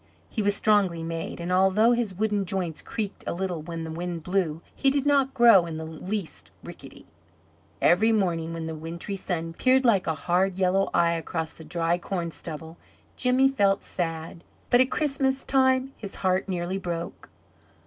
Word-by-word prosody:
He 220 Hz, -, -1 dB
was 205 Hz, 0 st, +2 dB
strongly 195 Hz, -6 st, +2 dB
made, 165 Hz, +1 st, -5 dB
and 170 Hz, +1 st, -4 dB
although 190 Hz, +5 st, +4 dB
his 235 Hz, -6 st, 0 dB
wooden 210 Hz, 0 st, 0 dB
joints 180 Hz, -4 st, -2 dB
creaked 210 Hz, -3 st, -5 dB
a -, -, -2 dB
little 180 Hz, -3 st, -3 dB
when 165 Hz, +1 st, -6 dB
the 160 Hz, -, -5 dB
wind 170 Hz, 0 st, -4 dB
blew 175 Hz, -3 st, -1 dB
he 275 Hz, -, +2 dB
did 275 Hz, 0 st, 0 dB
not 275 Hz, -2 st, +2 dB
grow 230 Hz, -8 st, +6 dB
in 160 Hz, -1 st, -5 dB
the 160 Hz, -, -5 dB
least 180 Hz, +4 st, -5 dB
rickety. -, -, -11 dB, 0.8 s
Every 215 Hz, +6 st, +5 dB
morning, 170 Hz, -6 st, 0 dB
when 165 Hz, -1 st, -5 dB
the 160 Hz, -, -4 dB
wintry 165 Hz, +5 st, -5 dB
sun 165 Hz, -3 st, -3 dB
peered 260 Hz, +7 st, +3 dB
like 205 Hz, -6 st, +3 dB
a 160 Hz, -, 0 dB
hard 180 Hz, +3 st, +1 dB
yellow 190 Hz, +1 st, +2 dB
eye 170 Hz, 0 st, +3 dB
across 165 Hz, -1 st, -3 dB
the 160 Hz, -, -12 dB
dry 170 Hz, +2 st, 0 dB
corn 175 Hz, -2 st, -3 dB
stubble, 160 Hz, +1 st, -8 dB, 0.4 s
Jimmy 255 Hz, +1 st, +3 dB
felt 200 Hz, -7 st, +2 dB
sad, 165 Hz, -1 st, -4 dB, 0.3 s
but 245 Hz, -, +6 dB
at 255 Hz, -, +2 dB
Christmas 275 Hz, -3 st, 0 dB
time 260 Hz, 0 st, +2 dB
his 200 Hz, -3 st, -7 dB
heart 185 Hz, +1 st, +1 dB
nearly 180 Hz, +1 st, -2 dB
broke. 170 Hz, -3 st, -5 dB
185 Hz, 175 wpm, -26 LUFS, 165-215 Hz, 0.8 s, grow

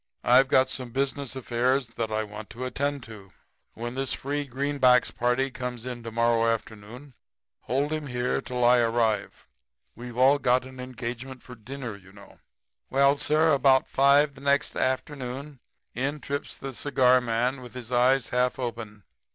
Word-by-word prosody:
'I've 130 Hz, +2 st, +5 dB
got 130 Hz, 0 st, +4 dB
some 130 Hz, -1 st, -4 dB
business 135 Hz, +1 st, -2 dB
affairs 125 Hz, 0 st, 0 dB
that 115 Hz, -1 st, -4 dB
I 110 Hz, 0 st, 0 dB
want 105 Hz, 0 st, -9 dB
to 120 Hz, +3 st, -6 dB
attend 140 Hz, +1 st, -2 dB
to. 105 Hz, -4 st, -12 dB, 0.4 s
When 120 Hz, +1 st, -5 dB
this 135 Hz, 0 st, -2 dB
free 145 Hz, +1 st, -3 dB
greenbacks 130 Hz, -1 st, +2 dB
party 125 Hz, +3 st, 0 dB
comes 125 Hz, -2 st, -5 dB
in 125 Hz, -2 st, -5 dB
to 115 Hz, -, -6 dB
morrow 115 Hz, 0 st, +2 dB
afternoon 115 Hz, +5 st, -7 dB, 0.5 s
hold 140 Hz, +4 st, -1 dB
him 155 Hz, -2 st, -3 dB
here 125 Hz, -1 st, -1 dB
till 125 Hz, -1 st, -1 dB
I 120 Hz, 0 st, +6 dB
arrive. 115 Hz, -3 st, 0 dB, 0.5 s
We've 120 Hz, +1 st, -9 dB
all 135 Hz, +3 st, +5 dB
got 125 Hz, 0 st, +2 dB
an 130 Hz, 0 st, -12 dB
engagement 125 Hz, +1 st, -6 dB
for 125 Hz, -, -11 dB
dinner, 125 Hz, 0 st, -7 dB
you 95 Hz, -1 st, -16 dB
know.' 100 Hz, 0 st, -16 dB, 0.5 s
"Well, 140 Hz, +1 st, +3 dB
sir, 155 Hz, +1 st, +3 dB
about 135 Hz, -1 st, +4 dB
5 140 Hz, +2 st, +4 dB
the 135 Hz, -, -15 dB
next 140 Hz, 0 st, +1 dB
afternoon 130 Hz, +1 st, -3 dB, 0.3 s
in 140 Hz, +5 st, -2 dB
trips 140 Hz, 0 st, -5 dB
the 135 Hz, -1 st, -7 dB
cigar 130 Hz, -1 st, +3 dB
man, 125 Hz, +3 st, -1 dB
with 125 Hz, 0 st, -12 dB
his 125 Hz, -1 st, -8 dB
eyes 125 Hz, +1 st, +3 dB
half 125 Hz, 0 st, +1 dB
open. 115 Hz, -5 st, -6 dB
125 Hz, 165 wpm, -26 LUFS, 120-135 Hz, 0.5 s, I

